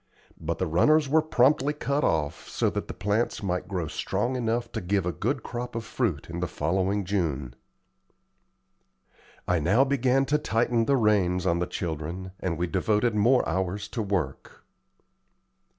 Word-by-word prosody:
But 80 Hz, +1 st, -3 dB
the 95 Hz, -, 0 dB
runners 145 Hz, -, +3 dB
were 155 Hz, +4 st, +4 dB
promptly 145 Hz, -1 st, +3 dB
cut 145 Hz, 0 st, -1 dB
off, 75 Hz, -1 st, -1 dB
so -, -, 0 dB
that -, -, -4 dB
the -, -, -5 dB
plants 105 Hz, +3 st, -1 dB
might 90 Hz, -2 st, -2 dB
grow 90 Hz, -4 st, -2 dB
strong 120 Hz, +10 st, -2 dB
enough 120 Hz, -1 st, -1 dB
to -, -, -4 dB
give 95 Hz, 0 st, 0 dB
a 90 Hz, -, 0 dB
good 120 Hz, +7 st, -2 dB
crop 120 Hz, 0 st, -5 dB
of 115 Hz, -1 st, -3 dB
fruit 100 Hz, -, -2 dB
in 85 Hz, +1 st, -5 dB
the 90 Hz, -, -1 dB
following 95 Hz, +5 st, 0 dB
June. 75 Hz, -10 st, -1 dB, 1.9 s
I 90 Hz, -1 st, +2 dB
now 100 Hz, -, +4 dB
began 135 Hz, -1 st, +2 dB
to 150 Hz, +3 st, +1 dB
tighten 115 Hz, -2 st, +1 dB
the 140 Hz, +2 st, +3 dB
reins 95 Hz, -5 st, +2 dB
on 85 Hz, -2 st, +2 dB
the 90 Hz, -, -1 dB
children, 85 Hz, +3 st, -4 dB
and 85 Hz, -3 st, -2 dB
we 85 Hz, -, 0 dB
all 85 Hz, -, -9 dB
devoted 105 Hz, +5 st, +1 dB
more 120 Hz, +5 st, +3 dB
hours 95 Hz, +2 st, -2 dB
to 115 Hz, -, -3 dB
work. 95 Hz, -10 st, -3 dB
100 Hz, 165 wpm, -27 LUFS, 90-120 Hz, 1.9 s, were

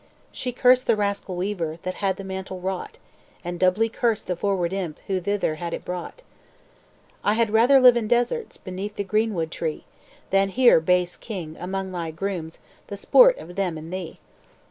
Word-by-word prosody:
"She 250 Hz, -, -4 dB
cursed 250 Hz, +1 st, +4 dB
the 230 Hz, -, +4 dB
rascal 200 Hz, -2 st, -2 dB
weaver, 175 Hz, -4 st, -3 dB
That 185 Hz, 0 st, -3 dB
had 195 Hz, -2 st, +1 dB
the 195 Hz, -, -7 dB
mantle 190 Hz, -1 st, -6 dB
wrought; 185 Hz, 0 st, -4 dB, 0.5 s
And 175 Hz, 0 st, -4 dB
doubly 185 Hz, +5 st, +3 dB
cursed 230 Hz, -1 st, -1 dB
the 180 Hz, -, -2 dB
froward 185 Hz, -1 st, -1 dB
imp 180 Hz, -6 st, -3 dB
Who 190 Hz, -1 st, -1 dB
thither 200 Hz, -3 st, 0 dB
had 170 Hz, -1 st, -3 dB
it -, -, -10 dB
brought. 180 Hz, -, -6 dB, 1.0 s
I 205 Hz, -, +3 dB
had 230 Hz, -2 st, +1 dB
rather 240 Hz, +5 st, +6 dB
live 250 Hz, -2 st, +8 dB
in 230 Hz, -2 st, -1 dB
deserts, 245 Hz, -, 0 dB
Beneath 195 Hz, +3 st, -6 dB
the 200 Hz, -, -2 dB
greenwood 200 Hz, -5 st, 0 dB
tree, 160 Hz, -3 st, -4 dB, 0.5 s
Than 195 Hz, 0 st, +3 dB
here, 240 Hz, -2 st, +5 dB
base 180 Hz, +2 st, +1 dB
king, 175 Hz, -8 st, -7 dB
among 190 Hz, +1 st, -4 dB
thy 170 Hz, -3 st, -4 dB
grooms 165 Hz, -1 st, -4 dB, 0.3 s
The 200 Hz, -, -6 dB
sport -, -, +6 dB
of 175 Hz, -, -10 dB
them 185 Hz, -5 st, -1 dB
and 160 Hz, +3 st, -8 dB
thee.' 185 Hz, -3 st, -6 dB
195 Hz, 180 wpm, -24 LUFS, 180-220 Hz, 1.0 s, live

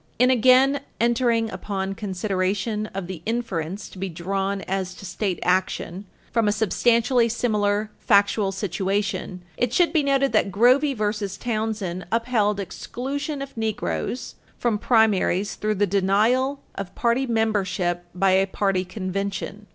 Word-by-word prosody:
In 250 Hz, +2 st, +5 dB
again 260 Hz, +3 st, +5 dB, 0.2 s
entering 235 Hz, -1 st, +2 dB
upon 190 Hz, 0 st, -3 dB
consideration 195 Hz, +2 st, -2 dB
of 195 Hz, -2 st, -5 dB
the 180 Hz, -3 st, -7 dB
inference 205 Hz, -5 st, -3 dB
to 185 Hz, -, -12 dB
be 195 Hz, 0 st, -2 dB
drawn 195 Hz, +3 st, -2 dB
as 190 Hz, -1 st, -3 dB
to -, -, -11 dB
state 185 Hz, +1 st, -2 dB
action 185 Hz, +1 st, 0 dB, 0.3 s
from 230 Hz, -2 st, +2 dB
a -, -, +4 dB
substantially 235 Hz, +3 st, +2 dB
similar 210 Hz, -2 st, 0 dB
factual 200 Hz, -1 st, +3 dB
situation, 195 Hz, -1 st, -2 dB
it 245 Hz, -1 st, 0 dB
should 350 Hz, +3 st, +3 dB
be 315 Hz, -, +4 dB
noted 275 Hz, -1 st, +2 dB
that 195 Hz, -, +2 dB
Grovey 255 Hz, +8 st, +4 dB
v. 210 Hz, -1 st, -1 dB
Townsend 215 Hz, -6 st, -3 dB
upheld 225 Hz, -3 st, +1 dB
exclusion 275 Hz, -, -4 dB
of 275 Hz, -, -10 dB
Negroes 220 Hz, +2 st, -3 dB, 0.2 s
from 230 Hz, -4 st, 0 dB
primaries 205 Hz, -4 st, +2 dB
through 215 Hz, 0 st, -1 dB
the 205 Hz, +1 st, +2 dB
denial 215 Hz, +8 st, +2 dB
of 195 Hz, -2 st, -7 dB
party 245 Hz, +3 st, +1 dB
membership 195 Hz, -6 st, 0 dB
by 190 Hz, +1 st, +3 dB
a 190 Hz, +1 st, +3 dB
party 195 Hz, -1 st, 0 dB
convention. 195 Hz, +2 st, -4 dB
210 Hz, 135 wpm, -24 LUFS, 195-235 Hz, 0.3 s, In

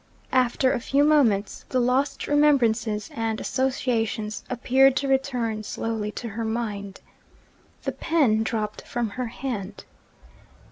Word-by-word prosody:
After 255 Hz, 0 st, +3 dB
a -, -, -1 dB
few 275 Hz, +4 st, +2 dB
moments, 245 Hz, -10 st, +2 dB
the 255 Hz, -, +1 dB
lost 255 Hz, +3 st, +1 dB
remembrances 240 Hz, -8 st, +2 dB
and 225 Hz, -1 st, -2 dB
associations 235 Hz, -5 st, -1 dB
appeared 260 Hz, +2 st, +4 dB
to 275 Hz, -, 0 dB
return 250 Hz, -5 st, 0 dB
slowly 215 Hz, 0 st, -3 dB
to 235 Hz, -, -5 dB
her 225 Hz, +2 st, -4 dB
mind. 210 Hz, -4 st, -4 dB, 0.8 s
The -, -, -1 dB
pen 270 Hz, -10 st, +2 dB
dropped 215 Hz, -1 st, -2 dB
from 240 Hz, -2 st, -3 dB
her 250 Hz, +2 st, -3 dB
hand. 220 Hz, -5 st, -5 dB
235 Hz, 125 wpm, -25 LUFS, 220-265 Hz, 0.8 s, appeared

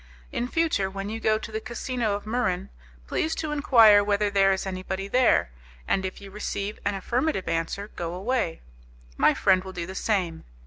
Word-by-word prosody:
In 245 Hz, -, -2 dB
future, 305 Hz, -11 st, +1 dB
when 195 Hz, +1 st, -5 dB
you 225 Hz, -, -4 dB
go 220 Hz, -1 st, +2 dB
to 220 Hz, -, -8 dB
the 220 Hz, 0 st, -3 dB
casino 235 Hz, -1 st, -2 dB
of 205 Hz, -, -6 dB
Muran, 215 Hz, -6 st, -1 dB, 0.4 s
please 315 Hz, -, -1 dB
to 310 Hz, -2 st, -3 dB
enquire 230 Hz, -8 st, +6 dB
whether 205 Hz, 0 st, +1 dB
there 195 Hz, -1 st, +4 dB
is 190 Hz, 0 st, -1 dB
anybody 190 Hz, +1 st, -4 dB
there, 245 Hz, -, +3 dB, 0.4 s
and 190 Hz, -, +1 dB
if 190 Hz, -, -5 dB
you 195 Hz, -1 st, -11 dB
receive 205 Hz, 0 st, -4 dB
an 205 Hz, 0 st, 0 dB
affirmative 240 Hz, -, -1 dB
answer, 165 Hz, +5 st, -2 dB
go 170 Hz, -3 st, -5 dB
away. 200 Hz, -3 st, -1 dB, 0.5 s
My -, -, +4 dB
friend 185 Hz, -1 st, +3 dB
will 190 Hz, 0 st, -8 dB
do 170 Hz, -2 st, -4 dB
the 190 Hz, -, -7 dB
same. 185 Hz, -6 st, -1 dB
200 Hz, 185 wpm, -26 LUFS, 190-230 Hz, 0.5 s, enquire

